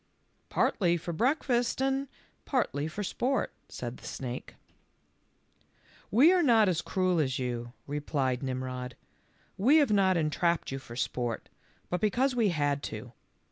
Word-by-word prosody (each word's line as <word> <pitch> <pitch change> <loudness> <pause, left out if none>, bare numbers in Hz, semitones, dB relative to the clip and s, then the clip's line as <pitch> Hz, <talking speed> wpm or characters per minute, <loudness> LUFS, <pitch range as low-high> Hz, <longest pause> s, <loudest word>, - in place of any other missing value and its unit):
"Partly 175 -4 +2
for 170 +1 -5
breakfast 245 - +1
and 270 +1 0 0.4
partly 155 - 0
for 200 +6 -4
sport," 255 +7 -1 0.2
said 120 0 -6
the - - -11
snake. 125 -1 -6 1.5
"We 280 - +6
are 365 - +4
not 230 -8 +5
as 175 -3 +1
cruel 185 -2 +1
as 130 -4 +1
you," 120 -2 -3
replied 140 -3 -1
Nim 130 -1 -2
rod; 125 -1 -5 0.3
" - - -36
we 265 +10 +6
have 290 -7 +4
not 190 -3 +4
entrapped 165 +1 0
you 135 - -3
for 120 -3 -11
sport, 120 -2 -2 0.4
but 180 0 -1
because 250 +5 +2
we 225 -4 +3
had 145 -4 0
to. 115 +1 -7
170 Hz, 145 wpm, -30 LUFS, -, 1.5 s, We